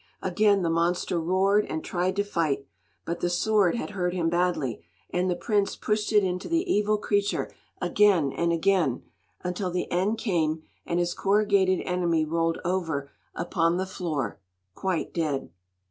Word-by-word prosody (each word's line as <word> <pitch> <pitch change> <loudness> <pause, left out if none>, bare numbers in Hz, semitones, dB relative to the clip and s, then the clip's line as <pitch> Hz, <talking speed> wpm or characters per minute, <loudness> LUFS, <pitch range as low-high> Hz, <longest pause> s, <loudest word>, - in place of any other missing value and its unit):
Again 200 +1 +3
the 170 - +1
monster 170 +1 +1
roared 190 +5 +3
and 160 - -4
tried 185 +1 -1
to 200 - +1
fight; 155 -8 -1 0.4
but 170 - -3
the 175 - 0
sword 200 +1 +2
had 235 - -4
hurt 180 -3 -1
him 165 -2 +1
badly, 170 - 0 0.3
and 180 +1 0
the 180 - +1
prince 205 +1 0
pushed 210 0 -1
it 210 -2 +5
into 180 0 -2
the 335 +2 +1
evil 210 -8 +2
creature 205 -1 0 0.3
again 180 -5 +3
and 170 0 0
again, 170 -6 +1 0.4
until 180 +1 -2
the 180 0 -3
end 195 +6 +1
came, 160 -8 0 0.2
and 170 - 0
his 175 0 +1
corrugated 200 -2 +2
enemy 170 -3 +1
rolled 165 +1 0
over 165 -6 -1 0.2
upon 170 0 +1
the 190 - -1
floor 155 - -3 0.3
quite 185 - -2
dead. 150 - -2
180 Hz, 160 wpm, -26 LUFS, 165-200 Hz, 0.4 s, it